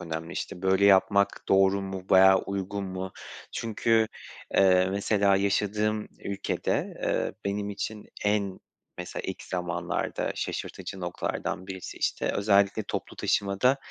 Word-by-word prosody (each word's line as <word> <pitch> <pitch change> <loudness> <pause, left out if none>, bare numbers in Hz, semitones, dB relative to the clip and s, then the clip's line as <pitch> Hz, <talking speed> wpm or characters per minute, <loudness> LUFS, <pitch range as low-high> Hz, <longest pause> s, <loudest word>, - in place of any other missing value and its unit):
önemli. 80 0 -5
İşte, 90 -1 -5
böyle 95 +1 +3
yapmak 100 0 +4
doğru 95 0 +4
mu 95 -1 -5
veya 95 0 +7
uygun 100 +1 -3
mu? 95 0 -5 0.4
Çünkü, 115 0 +1 0.5
eee, 95 -1 +5
mesela 100 0 +2
yaşadığım 105 +2 0 0.2
ülkede, 100 -1 -2
eee, - - 0
benim 100 +1 -2
için 105 +1 -5 0.2
en 100 -2 +1 0.4
mesela - - -5
ilk - - -5
zamanlarda 90 -2 -2
şaşırtıcı 95 - -5
noktalardan 90 +1 -3
birisi, 95 -1 -7
işte, - - 0
özellikle 100 +1 +3
toplu - - -5
taşımada 100 +7 +2
100 Hz, 120 wpm, -27 LUFS, 95-100 Hz, 0.5 s, veya